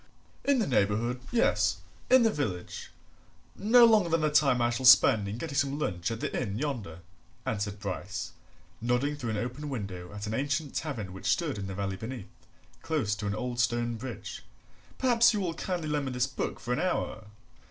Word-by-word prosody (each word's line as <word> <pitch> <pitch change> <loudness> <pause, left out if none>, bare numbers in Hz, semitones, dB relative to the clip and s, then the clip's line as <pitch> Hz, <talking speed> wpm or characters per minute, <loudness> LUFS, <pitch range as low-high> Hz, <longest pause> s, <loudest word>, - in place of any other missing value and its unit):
"In 280 -1 +3
the 225 - +1
neighbourhood, 120 - +1
yes; 240 - +2 0.3
in 260 -1 +7
the 225 - +4
village, 100 - -4 0.7
no 235 +4 +6
longer 215 -6 +4
than 165 0 +2
the 155 -1 +1
time 140 -4 +4
I 120 0 +2
shall 125 +2 +1
spend 110 -5 +7
in 100 +3 -4
getting 145 +2 -5
some 140 0 +1
lunch 90 - -2
at 115 0 -4
the - - -3
inn 105 -4 -3
yonder," 115 - -4 0.4
answered 105 -1 -2
Bryce, 100 0 -4 0.5
nodding 125 +5 +1
through 130 -5 -4
an 110 - -1
open 125 +7 -4
window 100 -8 -5
at 100 0 -6
an 105 - -3
ancient 145 +3 -1
tavern 110 - -4
which 95 +1 -6
stood 150 - +1
in 100 - -4
the 95 - -5
valley 95 -1 -3
beneath, 115 0 -7 0.5
close 145 -11 0
to 105 - -4
an 100 - -1
old 120 +1 -4
stone 120 0 +1
bridge. 120 0 -7 0.6
"Perhaps 240 -2 +4
you - - 0
will 180 -4 -1
kindly 175 -1 -3
lend 150 -2 -1
me 130 - -3
this 125 0 +1
book 135 - -4
for 120 - -2
an - - -1
hour? 180 -11 -2
125 Hz, 195 wpm, -29 LUFS, 105-150 Hz, 0.7 s, in